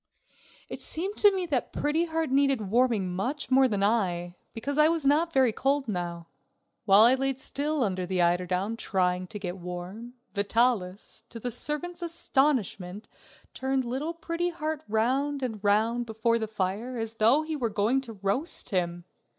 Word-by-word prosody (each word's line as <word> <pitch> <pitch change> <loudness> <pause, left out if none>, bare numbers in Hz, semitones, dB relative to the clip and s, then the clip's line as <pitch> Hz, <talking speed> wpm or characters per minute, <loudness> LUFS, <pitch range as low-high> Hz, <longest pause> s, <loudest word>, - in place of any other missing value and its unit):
It - - -7
seemed 380 +6 -2
to 410 - +7
me 375 -2 -1
that 280 -7 -1
Pretty 310 +3 0
Heart 320 -3 -2
needed 270 -7 +2
warming 230 -6 +2
much 260 +11 -3
more 265 0 +6
than 205 -4 -1
I, 180 -5 0 0.2
because 280 +6 -3
I 300 - +7
was 330 -3 -1
not 310 +4 +3
very 260 -6 +3
cold 275 +2 0
now. 175 -4 -4 0.6
While 200 +1 +7
I 240 +3 +7
laid 270 0 -1
still 290 +1 -1
under 185 -4 -2
the 185 0 -1
eiderdown 180 +5 +1
trying 180 -3 0
to 210 - -7
get 185 -2 -5
warm, 180 +7 -7 0.2
Vitalis, 205 -1 0
to 230 - -8
the 245 +2 -3
servant's 325 +8 -2
astonishment, 265 - 0 0.4
turned 265 -1 -1
little 280 +8 -3
Pretty 335 +1 -2
Heart 315 -2 -4
round 265 +6 0
and 220 -5 -4
round 225 +4 +2
before 230 +1 +1
the 220 - -2
fire 215 +4 -3
as 225 0 -4
though 235 +8 +4
he 315 0 -4
were 245 -6 -1
going 215 +6 +1
to 235 -4 -7
roast 250 - -1
him. 175 -2 -1
235 Hz, 165 wpm, -27 LUFS, 200-285 Hz, 0.6 s, to